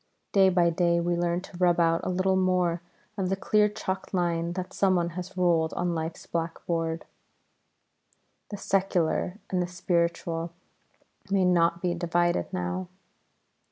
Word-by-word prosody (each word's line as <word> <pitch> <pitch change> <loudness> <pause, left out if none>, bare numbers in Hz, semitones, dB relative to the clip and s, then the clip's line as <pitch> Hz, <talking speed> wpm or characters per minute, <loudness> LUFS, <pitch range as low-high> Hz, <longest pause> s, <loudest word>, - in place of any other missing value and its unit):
Day 195 -1 +5
by 175 -2 +3
day 170 0 +2
we 175 0 0
learn 175 0 0
to 190 -1 -11
rub 175 -1 +3
out 165 0 +3
a - - -2
little 185 +1 +1
more 180 -2 +1 0.4
of 185 -1 0
the 195 - +1
clear 210 +2 +3
chalked 195 -2 -4
line 170 -1 0
that 185 0 -5
someone 185 -3 +2
has 180 +2 -7
ruled 170 -3 +2
on 175 -1 0
life's 160 0 -4
black 165 -1 -4
board; 165 -1 -2 1.4
the 205 - -5
Secular 185 -2 0
and 185 -1 +1
the 175 - -1
Spiritual 170 -1 -1 0.8
may 195 -1 +3
not 170 -1 +2
be 175 -1 +1
divided 175 +1 0
now. 180 0 -3
175 Hz, 150 wpm, -27 LUFS, 170-185 Hz, 1.4 s, Day